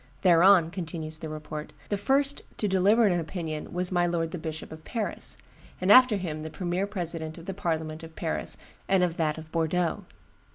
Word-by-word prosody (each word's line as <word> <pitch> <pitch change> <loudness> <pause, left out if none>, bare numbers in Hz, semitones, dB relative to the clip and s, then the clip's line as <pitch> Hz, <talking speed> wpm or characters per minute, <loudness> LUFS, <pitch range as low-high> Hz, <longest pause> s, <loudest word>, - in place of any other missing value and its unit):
'Thereon,' 175 -1 +6
continues 160 -3 -4
the 160 - -6
report, 155 0 -6 0.2
'the 205 - 0
first 275 +7 +2 0.2
to 210 - 0
deliver 200 +4 +4
an 180 -4 +3
opinion 160 -2 -5
was 180 +1 -2
my 175 -1 +2
lord 165 -1 -1
the 180 - -4
Bishop 160 0 -6
of 160 0 -10
Paris; 220 +2 -3 0.4
after 220 +5 +7
him 160 -5 -4
the 155 - -5
premier 180 +3 -2
president 170 -5 -4
of 170 - -10
the 195 - -4
parliament 160 -4 -2
of 160 -1 -11
Paris - - -3 0.3
and 190 -2 +3
of 175 -2 0
that 155 -2 0
of 160 0 -10
Bordeaux. 165 +1 0
170 Hz, 180 wpm, -27 LUFS, 160-190 Hz, 0.4 s, after